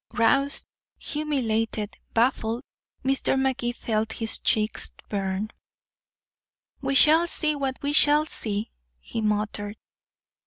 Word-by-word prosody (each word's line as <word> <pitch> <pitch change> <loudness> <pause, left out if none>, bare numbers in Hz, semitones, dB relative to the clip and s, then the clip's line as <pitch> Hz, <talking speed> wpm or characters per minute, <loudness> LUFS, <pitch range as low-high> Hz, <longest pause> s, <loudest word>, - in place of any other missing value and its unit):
Roused, 275 +5 +3 0.3
humiliated, 225 -8 -1 0.2
baffled, 230 0 +1 0.4
Mr. 270 0 +2
Magee 265 -2 0
felt 220 -2 -2
his 225 -1 -1
cheeks 215 0 +1 0.2
burn. 195 +1 -2 1.3
"We 275 0 -1
shall 315 +5 +6
see 310 -2 +2
what 270 -2 -2
we 285 +1 0
shall 295 +1 +5
see," 215 -7 -2 0.3
he 225 - -5
muttered. 210 0 -1
235 Hz, 105 wpm, -26 LUFS, 215-275 Hz, 1.3 s, shall